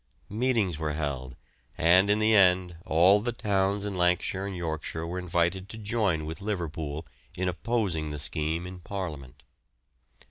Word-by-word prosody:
Meetings 110 Hz, -, +1 dB
were 75 Hz, -1 st, -1 dB
held, 70 Hz, -4 st, -3 dB, 0.4 s
and 90 Hz, +5 st, +5 dB
in 105 Hz, -, +4 dB
the 110 Hz, +1 st, +3 dB
end 90 Hz, -3 st, +4 dB
all 90 Hz, +6 st, +5 dB
the 120 Hz, +2 st, -1 dB
towns 100 Hz, -2 st, 0 dB
in 100 Hz, -, -3 dB
Lancashire 90 Hz, +2 st, +1 dB
and 95 Hz, -2 st, -5 dB
Yorkshire 80 Hz, -1 st, -3 dB
were 90 Hz, +2 st, -4 dB
invited 90 Hz, +2 st, 0 dB
to 110 Hz, -, -7 dB
join 105 Hz, -7 st, 0 dB
with 80 Hz, +5 st, -6 dB
Liverpool 80 Hz, -6 st, -3 dB, 0.3 s
in 95 Hz, +1 st, -1 dB
opposing 90 Hz, -5 st, -1 dB
the 75 Hz, -, -5 dB
scheme 80 Hz, +5 st, -2 dB
in 90 Hz, 0 st, -8 dB
Parliament. 80 Hz, -10 st, -6 dB
90 Hz, 150 wpm, -28 LUFS, 80-100 Hz, 0.4 s, and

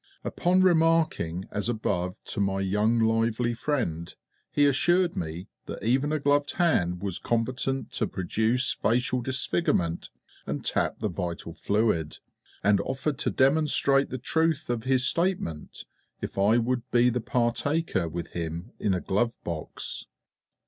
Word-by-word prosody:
Upon 185 Hz, +1 st, +2 dB
remarking 165 Hz, -, +2 dB
as 105 Hz, +3 st, -1 dB
above 90 Hz, -5 st, -2 dB
to -, -, -6 dB
my 95 Hz, -1 st, 0 dB
young 105 Hz, +4 st, +2 dB
lively 115 Hz, +1 st, +1 dB
friend, 115 Hz, -, -2 dB, 0.4 s
he 145 Hz, -, +3 dB
assured 175 Hz, +6 st, +3 dB
me 85 Hz, +2 st, -5 dB, 0.2 s
that -, -, -7 dB
even 135 Hz, +6 st, +2 dB
a 155 Hz, -, +1 dB
gloved 145 Hz, 0 st, +1 dB
hand 90 Hz, -, +1 dB
was 95 Hz, -3 st, -2 dB
competent 130 Hz, +3 st, -1 dB
to -, -, -1 dB
produce 110 Hz, +7 st, 0 dB
facial 125 Hz, +3 st, 0 dB
disfigurement 120 Hz, -, 0 dB, 0.4 s
and -, -, -4 dB
tap -, -, 0 dB
the -, -, +1 dB
vital 85 Hz, -3 st, -4 dB
fluid, 95 Hz, -3 st, 0 dB, 0.5 s
and 100 Hz, -1 st, +4 dB
offered 135 Hz, +1 st, -2 dB
to -, -, 0 dB
demonstrate 140 Hz, 0 st, +3 dB
the 130 Hz, -, -4 dB
truth 160 Hz, +2 st, 0 dB
of 115 Hz, -2 st, -3 dB
his 130 Hz, -1 st, +2 dB
statement 165 Hz, -, -1 dB, 0.3 s
if -, -, -5 dB
I 100 Hz, +4 st, +4 dB
would 120 Hz, +1 st, 0 dB
be 125 Hz, 0 st, +4 dB
the 125 Hz, 0 st, -1 dB
partaker 120 Hz, -, 0 dB
with 85 Hz, +2 st, -5 dB
him 85 Hz, 0 st, -5 dB
in 100 Hz, -3 st, +1 dB
a 90 Hz, -, -2 dB
glove 115 Hz, +4 st, 0 dB
box. 85 Hz, -2 st, -5 dB
120 Hz, 140 wpm, -27 LUFS, 95-140 Hz, 0.5 s, and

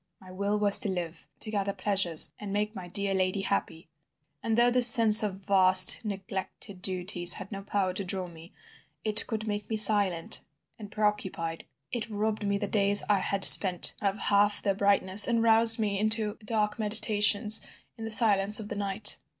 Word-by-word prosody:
My 185 Hz, -1 st, -19 dB
will 200 Hz, +3 st, -6 dB
was 205 Hz, -1 st, +2 dB
to 205 Hz, -, -2 dB
live, 175 Hz, -3 st, -10 dB
to 215 Hz, -, -5 dB
gather 200 Hz, -2 st, -6 dB
pleasures 185 Hz, -4 st, -1 dB
and 205 Hz, -2 st, -11 dB
make 210 Hz, +1 st, -6 dB
my 185 Hz, -2 st, -12 dB
dear 200 Hz, +2 st, -5 dB
lady 190 Hz, +1 st, -5 dB
happy. 170 Hz, -4 st, -8 dB, 0.5 s
But 225 Hz, -1 st, -6 dB
though 240 Hz, +1 st, -1 dB
this 250 Hz, -1 st, +6 dB
sense 225 Hz, -3 st, +9 dB
of 200 Hz, -2 st, -8 dB
vast 185 Hz, -1 st, +4 dB
neglected 195 Hz, -1 st, -10 dB
duties 180 Hz, -1 st, +1 dB
had 195 Hz, -, -10 dB
no 195 Hz, -1 st, -10 dB
power 195 Hz, -2 st, -6 dB
to 195 Hz, -, -7 dB
draw 185 Hz, 0 st, -7 dB
me, 170 Hz, 0 st, -18 dB, 0.5 s
it 215 Hz, 0 st, -2 dB
could 220 Hz, -2 st, -9 dB
make 205 Hz, -1 st, -8 dB
me 220 Hz, -, -6 dB
silent 200 Hz, -5 st, +3 dB, 0.4 s
and 210 Hz, -1 st, -14 dB
preoccupied, 195 Hz, -6 st, -7 dB, 0.3 s
it 230 Hz, -2 st, -8 dB
robbed 215 Hz, +1 st, -7 dB
the 200 Hz, 0 st, -6 dB
days 200 Hz, 0 st, +3 dB
I 200 Hz, -, -2 dB
had 195 Hz, +1 st, -4 dB
spent 185 Hz, -3 st, +5 dB
of 200 Hz, -1 st, -5 dB
half 205 Hz, 0 st, -2 dB
their 200 Hz, -, -4 dB
brightness 200 Hz, 0 st, +3 dB
and 230 Hz, -1 st, -4 dB
roused 225 Hz, 0 st, +5 dB
me 205 Hz, -3 st, -6 dB
into 215 Hz, 0 st, -2 dB
dark 210 Hz, 0 st, -6 dB
meditations 210 Hz, 0 st, 0 dB, 0.3 s
in 225 Hz, -, -14 dB
the 225 Hz, -, -9 dB
silence 210 Hz, -2 st, +2 dB
of 210 Hz, -1 st, -12 dB
the -, -, -9 dB
night. 200 Hz, +1 st, -2 dB
205 Hz, 180 wpm, -23 LUFS, 190-215 Hz, 0.5 s, sense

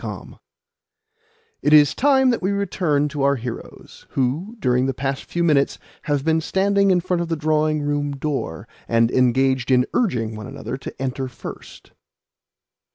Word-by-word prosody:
Moreover, -, -, -8 dB, 1.2 s
it 150 Hz, -, +2 dB
is 150 Hz, -2 st, +7 dB
time 265 Hz, -1 st, +3 dB
that 235 Hz, -, -1 dB
we 185 Hz, -, 0 dB
returned 175 Hz, -7 st, 0 dB
to 145 Hz, -1 st, -4 dB
our 140 Hz, +1 st, +3 dB
heroes, 120 Hz, -2 st, -9 dB
who, 150 Hz, -, -1 dB
during 125 Hz, -, +1 dB
the 135 Hz, -, -2 dB
past 135 Hz, 0 st, -3 dB
few 170 Hz, -, -2 dB
minutes, 145 Hz, -4 st, +2 dB, 0.3 s
have 145 Hz, -1 st, -1 dB
been 160 Hz, 0 st, +2 dB
standing 200 Hz, +3 st, +2 dB
in 180 Hz, -2 st, +3 dB
front 180 Hz, -1 st, -1 dB
of 170 Hz, -, -2 dB
the 165 Hz, -, 0 dB
drawing 155 Hz, 0 st, +1 dB
room 145 Hz, 0 st, -1 dB
door, 135 Hz, -, -4 dB, 0.2 s
and 115 Hz, 0 st, +2 dB
engaged 130 Hz, 0 st, +2 dB
in 125 Hz, -1 st, +4 dB
urging 120 Hz, -, 0 dB
one 110 Hz, +2 st, -7 dB
another 135 Hz, 0 st, -6 dB
to 135 Hz, -, -9 dB
enter 130 Hz, 0 st, -3 dB
first. 125 Hz, -, -10 dB
145 Hz, 160 wpm, -21 LUFS, 130-170 Hz, 1.2 s, is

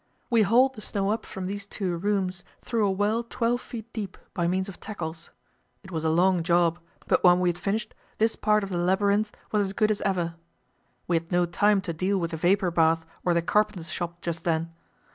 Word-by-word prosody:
We 230 Hz, -2 st, +5 dB
hauled 245 Hz, +6 st, +4 dB
the 215 Hz, -, -10 dB
snow 200 Hz, -1 st, -1 dB
up 220 Hz, -, -3 dB
from 190 Hz, -1 st, -6 dB
these 200 Hz, +1 st, -5 dB
two 190 Hz, -4 st, -2 dB
rooms 185 Hz, -1 st, -1 dB, 0.2 s
through 225 Hz, -3 st, +1 dB
a -, -, +2 dB
well 205 Hz, +4 st, +1 dB
twelve 235 Hz, +1 st, -1 dB
feet 235 Hz, 0 st, -9 dB
deep 205 Hz, -4 st, -5 dB, 0.2 s
by 170 Hz, -1 st, 0 dB
means 185 Hz, +2 st, 0 dB
of 195 Hz, -, -9 dB
tackles. 165 Hz, -6 st, -6 dB, 0.5 s
It 190 Hz, -, -12 dB
was 160 Hz, -2 st, -3 dB
a 160 Hz, -, +2 dB
long 180 Hz, +2 st, +3 dB
job, 170 Hz, 0 st, +2 dB, 0.3 s
but -, -, +2 dB
when 180 Hz, 0 st, +6 dB
we 180 Hz, -1 st, +2 dB
had 175 Hz, 0 st, -3 dB
finished 205 Hz, +4 st, -2 dB, 0.2 s
this 225 Hz, +1 st, +2 dB
part 210 Hz, -1 st, +2 dB
of 195 Hz, -, -5 dB
the 175 Hz, -, -1 dB
labyrinth 200 Hz, +4 st, +2 dB, 0.2 s
was 205 Hz, -2 st, +2 dB
as 190 Hz, -, -6 dB
good 215 Hz, +2 st, +2 dB
as 210 Hz, -, -1 dB
ever. 180 Hz, -4 st, 0 dB, 0.7 s
We 170 Hz, -, +3 dB
had 165 Hz, +2 st, -6 dB
no 175 Hz, 0 st, +3 dB
time 205 Hz, +3 st, +2 dB
to 180 Hz, -3 st, -4 dB
deal 185 Hz, +5 st, 0 dB
with 170 Hz, -2 st, -2 dB
the 160 Hz, -, -3 dB
vapour 180 Hz, +2 st, +2 dB
bath 165 Hz, -1 st, +3 dB, 0.2 s
or 175 Hz, -1 st, +2 dB
the 170 Hz, -, +2 dB
carpenter's 180 Hz, -4 st, +1 dB
shop 175 Hz, 0 st, -4 dB
just 170 Hz, -1 st, -4 dB
then. 165 Hz, 0 st, -1 dB
190 Hz, 220 wpm, -26 LUFS, 170-210 Hz, 0.7 s, when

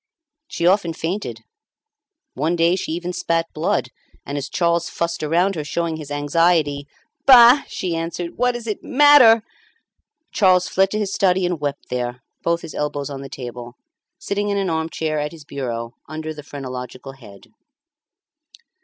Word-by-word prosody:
She 170 Hz, -, -3 dB
often 180 Hz, -2 st, +3 dB
fainted. 160 Hz, -, -4 dB, 0.9 s
One 155 Hz, +6 st, 0 dB
day 170 Hz, +1 st, +3 dB
she 185 Hz, -, -4 dB
even 175 Hz, +1 st, -4 dB
spat 165 Hz, -1 st, 0 dB
blood, 155 Hz, -, -1 dB, 0.4 s
and, 140 Hz, -, -5 dB
as 140 Hz, -1 st, -4 dB
Charles 170 Hz, -1 st, 0 dB
fussed 170 Hz, 0 st, -3 dB
around 170 Hz, +6 st, +2 dB
her 155 Hz, -5 st, -4 dB
showing 165 Hz, +2 st, -2 dB
his 150 Hz, -3 st, -9 dB
anxiety 145 Hz, 0 st, +1 dB, 0.4 s
"Bah!" 250 Hz, +1 st, +9 dB
she 180 Hz, -3 st, -3 dB
answered, 170 Hz, +1 st, -4 dB
"what 250 Hz, +1 st, +1 dB
does 240 Hz, -1 st, -7 dB
it 215 Hz, -3 st, -4 dB
matter?" 265 Hz, -6 st, +6 dB, 0.9 s
Charles 185 Hz, -3 st, +3 dB
fled 190 Hz, 0 st, +2 dB
to 210 Hz, -, -2 dB
his 205 Hz, -2 st, -2 dB
study 190 Hz, -2 st, +2 dB
and 175 Hz, -3 st, -2 dB
wept 145 Hz, -1 st, -4 dB
there, 125 Hz, 0 st, -3 dB, 0.2 s
both 170 Hz, 0 st, 0 dB
his 165 Hz, -, -9 dB
elbows 145 Hz, -1 st, -3 dB
on 135 Hz, -1 st, -6 dB
the 135 Hz, -, -8 dB
table, 120 Hz, -2 st, -8 dB, 0.4 s
sitting 205 Hz, +1 st, -2 dB
in 200 Hz, -, 0 dB
an 195 Hz, -3 st, 0 dB
arm 160 Hz, 0 st, -1 dB
chair 155 Hz, -2 st, -2 dB
at 150 Hz, +2 st, -3 dB
his 155 Hz, -3 st, -13 dB
bureau 115 Hz, -5 st, -4 dB, 0.2 s
under 155 Hz, 0 st, -5 dB
the 150 Hz, -, -9 dB
phrenological 130 Hz, -2 st, -7 dB
head. 110 Hz, -7 st, -15 dB
165 Hz, 160 wpm, -21 LUFS, 145-185 Hz, 0.9 s, Bah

